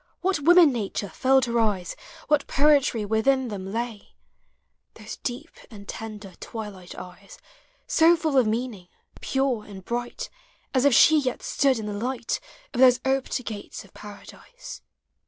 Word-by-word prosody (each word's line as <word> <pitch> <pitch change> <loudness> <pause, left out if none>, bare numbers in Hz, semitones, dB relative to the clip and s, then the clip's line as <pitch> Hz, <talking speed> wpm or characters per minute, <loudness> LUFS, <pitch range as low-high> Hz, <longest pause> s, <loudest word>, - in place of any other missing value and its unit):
POEMS - - -40
OF - - -38
HOME. 360 -6 -2
What 350 +1 +7
woman 325 -6 +7
nature 205 -3 -3
filled 265 0 +2
her 235 0 0
eyes, 200 -6 -1 0.3
What 295 -1 +2
poetry 275 -6 +3
within 245 +5 +1
them 195 -2 -6
lay 230 -1 -5 0.4
— - - -50
Those - - -9
deep 245 -1 -5 0.2
and 200 -3 -12
tender 210 -3 -8
twilight 205 -5 -8
eyes, 180 +2 -11 0.5
t$o 330 +2 +5
full 320 -4 -2
of 255 -4 +4
meaning, 220 -5 -3 0.3
pure 265 -5 -1
and 195 -3 -11
bright 240 0 -4 0.4
As 260 0 +2
if 280 -4 +5
she 315 0 +7
yet 255 -3 -3
stood 275 -3 +1
in 220 - -5
the 210 - -4
light 240 +3 -3 0.3
Of 245 - -4
those 250 -1 +6
oped 265 -2 -1
gates 210 -2 -7
of 195 - -21
Paradise. 210 - -11
240 Hz, 165 wpm, -25 LUFS, 210-270 Hz, 0.5 s, What